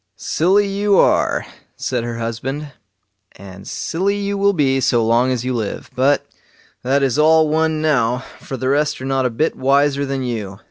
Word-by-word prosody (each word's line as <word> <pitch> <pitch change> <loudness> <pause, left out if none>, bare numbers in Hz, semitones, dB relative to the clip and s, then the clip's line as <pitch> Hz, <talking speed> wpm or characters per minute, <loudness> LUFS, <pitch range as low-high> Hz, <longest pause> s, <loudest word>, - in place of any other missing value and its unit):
"Silly 190 +5 +1
you 200 0 +1
are", - - +2 0.3
said 125 -3 -2
her 120 -1 -4
husband, 130 +6 -4 0.6
"and 95 -1 -12
silly 195 +4 -1
you 200 0 -2
will 200 0 +3
be 135 -6 +1
so 120 -3 +2
long 120 +3 +2
as 125 -1 -2
you 130 - -1
live; 110 -4 -4
but 135 +3 +2 0.6
that 135 +2 +1
is 135 +1 +1
all 160 +1 +5
one 155 0 0
now, 125 -4 +1 0.2
for 135 - -7
the 130 0 -2
rest 150 +2 +1
are 130 - -6
not 135 -1 +1
a - - -2
bit 125 +8 -1
wiser 140 +1 +2
than 135 -1 -3
you. 105 -6 -5
135 Hz, 180 wpm, -19 LUFS, 120-155 Hz, 0.6 s, all